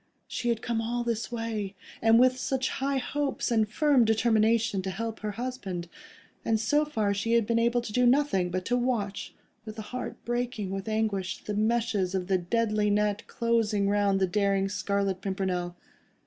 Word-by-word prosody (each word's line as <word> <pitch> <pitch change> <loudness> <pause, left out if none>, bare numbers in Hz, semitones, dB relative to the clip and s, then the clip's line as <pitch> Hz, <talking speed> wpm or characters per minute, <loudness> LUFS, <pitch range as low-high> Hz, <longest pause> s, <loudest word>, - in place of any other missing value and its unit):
She 240 - -2
had 230 -1 -1
come 230 -1 -1
all 240 +1 -2
this 230 -1 -2
way, 220 -4 -3 0.3
and 225 0 +5
with 255 +1 +4
such 265 0 -1
high 275 +1 -1
hopes 275 0 -2
and 220 -2 +2
firm 280 +1 +3
determination 220 -2 +2
to 190 - -4
help 225 +4 -4
her 210 -1 -4
husband, 205 -8 -4 0.6
and 225 -1 +1
so 295 +8 +2
far 220 -9 0
she 210 +4 -1
had 235 -2 +4
been 230 +1 +1
able 235 +1 +2
to 230 -3 -7
do 250 +1 +4
nothing, 245 -9 +2
but 185 +1 -3
to 245 - +1
watch, 235 -5 -2 0.3
with 215 0 -9
a 215 - -5
heart 250 - -4
breaking 240 -4 -2
with 195 +2 -4
anguish, 210 -4 -1
the 210 - -4
meshes 215 -3 0
of 185 -1 -1
the 190 0 +1
deadly 210 +2 +1
net 210 +1 0
closing 225 -4 +1
round 200 -1 +2
the 190 - +3
daring 195 0 +1
Scarlet 200 -2 -1
Pimpernel. 185 -3 -2
220 Hz, 180 wpm, -28 LUFS, 200-235 Hz, 0.6 s, and